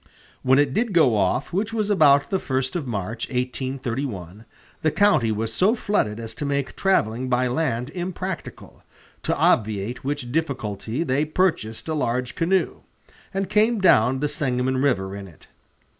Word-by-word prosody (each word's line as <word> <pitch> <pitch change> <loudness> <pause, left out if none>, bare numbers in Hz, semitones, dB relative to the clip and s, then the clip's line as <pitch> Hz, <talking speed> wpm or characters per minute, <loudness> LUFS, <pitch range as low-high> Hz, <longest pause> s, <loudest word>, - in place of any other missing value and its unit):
When 130 +1 +4
it 145 -2 +3
did 225 +2 0
go 150 -9 +5
off, 105 - 0
which 210 +5 -1
was 215 -2 0
about 145 -7 +4
the 190 - +1
first 130 -1 -2
of 160 -6 -2
March, 110 0 -4
1831, 125 -6 -4 0.4
the 155 - +3
county 155 - +3
was 110 +1 -2
so 200 - +3
flooded 115 - -1
as 115 -1 -6
to 145 - -6
make 140 -1 -2
traveling 130 - +1
by 125 0 +2
land 125 -1 -1
impracticable, 185 +1 -6 0.4
to - - -1
obviate 110 +2 +1
which 140 -3 -3
difficulty 130 -4 -2
they 140 -1 +1
purchased 155 - -1
a 160 - -1
large 125 -4 -1
canoe, 185 +3 +1 0.5
and 195 0 -2
came 220 +4 +3
down 130 - +4
the 150 - +1
Sangamon 130 -2 -1
River 100 -8 0
in 100 -1 -7
it. 80 -4 -18
130 Hz, 160 wpm, -23 LUFS, 115-165 Hz, 0.5 s, go